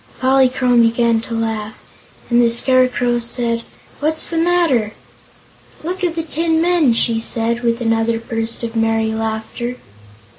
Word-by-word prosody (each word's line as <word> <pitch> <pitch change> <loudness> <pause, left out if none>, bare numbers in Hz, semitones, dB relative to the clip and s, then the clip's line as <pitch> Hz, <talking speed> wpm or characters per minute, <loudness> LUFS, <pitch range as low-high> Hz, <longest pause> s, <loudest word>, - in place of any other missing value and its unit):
Polychrome 255 -2 +3
began 230 0 +2
to 230 0 -6
laugh, 220 -1 -3 0.5
and 240 0 +4
the 235 - +3
Scarecrow 245 0 +2
said: 235 0 0 0.4
"What's 310 +2 +1
the 330 - 0
matter?" 325 -11 +1 0.9
"Look 365 +3 -4
at 340 -2 0
the 330 - -2
tin 320 +1 -1
men!" 335 -7 +3
she 230 0 +1
said, 230 +1 0
with 235 0 -1
another 225 0 0
burst 225 0 -4
of 230 0 -5
merry 225 0 0
laughter. 225 +2 -4
235 Hz, 140 wpm, -17 LUFS, 225-265 Hz, 0.9 s, and